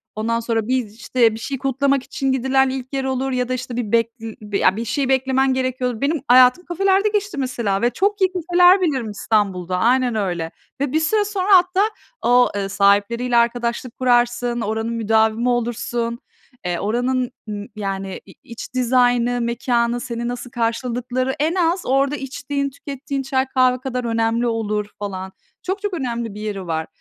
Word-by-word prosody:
ondan 230 +2 -1
sonra, 225 -2 -1
bir, 255 -1 +1
işte, 230 +2 +1
bir 220 - -7
şey 270 +4 -4
kutlamak 270 +1 +1
için 270 0 -2
gidilen 265 +1 +2
ilk 260 0 -6
yer 270 - -1
olur 265 0 -1
ya 250 0 -1
da - - 0
işte 250 -1 -5
bir 230 -4 -3
bek 230 -1 +3
eee, 225 -1 -7 0.2
ya 185 - +4
bir 230 +2 -4
şey 265 +4 -1
beklemen 265 0 +2
gerekiyordur. 255 -2 -2
Benim 290 +1 0
hayatım 255 +7 +6
kafelerde 390 +4 +2
geçti 410 -5 -2
mesela 235 -7 -1
ve 240 - +3
çok 400 +8 0
iyi 375 - +5
kafeler 360 +1 +4
bilirim 265 -10 0
İstanbul'da, 195 -4 0
aynen 245 +4 +2
öyle. 175 -6 -2 0.3
Ve 280 - 0
bir 315 - +2
süre 415 +7 +1
sonra 395 -2 -2
hatta 365 +2 +2 0.4
o, 245 +1 +4
ııı, 195 -1 -2
sahipleriyle 205 +5 +2
arkadaşlık 235 +1 0
kurarsın, 240 -1 +1
oranın 220 +2 -2
müdavimi 225 +1 +2
olursun, 235 0 -2 0.5
eee, 175 -1 -1
oranın, 245 +4 0 0.2
ııı, 205 0 -5
yani, 195 -2 -4
i 190 - -15
iç 235 +1 -9
dizaynı, 245 -1 +2
mekânı, 235 0 0
seni 235 -1 -4
nasıl 245 0 -5
karşıladıkları, 245 +2 -1
en 315 +4 +1
az 350 0 +1
orada 275 +2 +2
içtiğin, 280 0 -3
tükettiğin 275 0 -5
çay, 265 0 0
kahve 255 -1 +2
kadar 250 -1 -3
önemli 230 +1 +1
olur, 215 -2 -1
falan. 190 -2 -5 0.3
Çok 385 +2 -3
çok 410 -3 -3
önemli 235 - -3
bir 210 - -8
yeri 200 -4 -4
var. 160 -1 -2
245 Hz, 170 wpm, -21 LUFS, 225-270 Hz, 0.5 s, hayatım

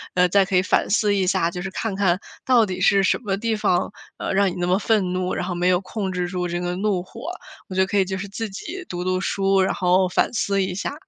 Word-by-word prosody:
呃， 180 0 +4
再 195 +1 +4
可 190 - -2
以 180 - +5
反 185 - +1
思 210 -1 +2
一 190 -2 +1
下， 170 -2 +1
就 180 0 -5
是 190 - -4
看 215 -1 -3
看 190 -2 +2 0.3
到 245 -3 +5
底 185 -3 -5
是 195 0 +4
什 190 - +2
么 195 -4 -2
地 230 +1 -1
方， 185 -4 +1 0.3
呃， - - -3
让 195 0 +3
你 175 - -6
那 175 - -1
么 185 +2 +2
愤 205 -4 +1
怒， 185 0 -1
然 - - -2
后 180 - -3
没 175 +1 0
有 180 -1 +4
控 195 0 -4
制 180 -1 -2
住 180 -1 -2
这 175 0 -3
个 180 0 -2
怒 190 -1 0
火？ 230 +5 -12 0.5
我 185 - -7
觉 190 - +3
得 - - +4
可 205 - -1
以 190 - +3
就 190 0 -3
是 200 +2 -5
自 210 +2 -5
己 355 - -7
读 175 0 -4
读 185 0 0
书， 195 0 +1
然 190 - +1
后 185 +1 +2
反 - - +1
思 200 -2 +1
一 185 -1 -3
下。 200 - -3
190 Hz, 300 characters per minute, -22 LUFS, 180-200 Hz, 0.5 s, 以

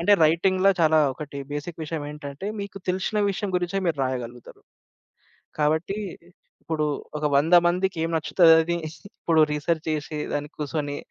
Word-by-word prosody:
అంటే 190 +5 +4
రైటింగ్‌ల 185 +4 +3
చాలా 160 -1 +5
ఒకటి 145 +1 -8
బేసిక్ 155 +3 -5
విషయమెటంటే 150 +1 -6
మీకు 200 0 -7
తెలిశిన 190 +4 0
విషయం 200 +1 -3
గురించే 180 +2 -1
మీరు 160 -4 0
రాయగలుగుతరు. 125 -2 -6 1.0
కాబట్టి 160 +6 +1 0.6
ఇప్పుడు 155 -2 -1 0.3
ఒక 150 - -2
వంద 165 +5 +4
మందికెం 175 -2 0
నచ్చుతదది? 165 +1 +4 0.4
ఇప్పుడు 160 -2 +3
రిసర్చ్ 160 +2 -1
చేశి, 150 0 -3
దానికి 145 +1 -4
కూసోనీ 145 -1 -3
160 Hz, 125 wpm, -24 LUFS, 150-175 Hz, 1.0 s, చాలా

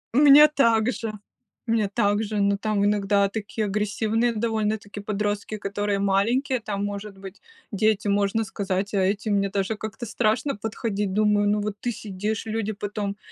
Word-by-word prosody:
У - - +3
меня 295 +1 +9
также, 230 -5 +1 0.6
мне 225 -3 +1
также, 205 0 0
но, 200 0 +3
там, 205 -1 0
иногда 200 -1 +2
такие 215 +1 -4
агрессивные 215 +3 0
довольно-таки 215 -2 -2
подростки, 205 +1 -2
которые 205 0 -2
маленькие, 230 +7 +1
там, 205 -1 -3
может 205 0 -6
быть 195 0 -11 0.3
дети, 215 +1 +1
можно 200 +2 +1
сказать, 195 0 -3
а 195 - +2
эти 200 +3 0
мне 200 -1 +1
даже 200 +2 -1
как-то 220 +2 -6
страшно 225 +5 0
подходить. 210 -2 -3
Думаю, 210 0 +3
ну 210 - +2
вот 205 0 -3
ты 240 - -1
сидишь, 210 +1 -4
люди 220 -1 -2
потом 205 -1 -4
210 Hz, 155 wpm, -24 LUFS, 200-220 Hz, 0.6 s, меня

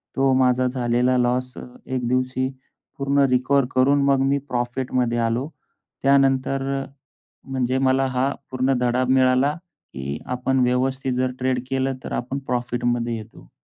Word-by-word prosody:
तो 135 0 +3
माझा 130 0 +3
झालेला 125 0 +1
लॉस 125 +1 0
अ, - - -6 0.2
एक 130 -2 -2
दिवशी 130 +1 0 0.5
पूर्ण 140 +1 +1
रिकव्हर 130 +2 +2
करून 140 +2 +4
मग 135 -1 +3
मी 135 +1 +2
प्रॉफिटमध्ये 120 0 -1
आलो. 120 +5 0 0.5
त्यानंतर 135 0 +3 0.2
अ, - - -6 0.7
म्हणजे 130 -1 0
मला 135 0 +2
हा 130 +1 0 0.2
पूर्ण 130 +1 +1
धडा 125 +1 +1
मिळाला, 130 +2 +3 0.4
की 70 +2 -5
आपण 125 +1 -1
व्यवस्थित 130 +1 +1
जर 130 0 0
ट्रेड 130 0 0
केलं, 135 0 0
तर - - -6
आपण 130 +3 -3
प्रॉफिटमध्ये 120 -1 -1
येतो. 105 - -12
130 Hz, 140 wpm, -22 LUFS, 125-135 Hz, 0.7 s, करून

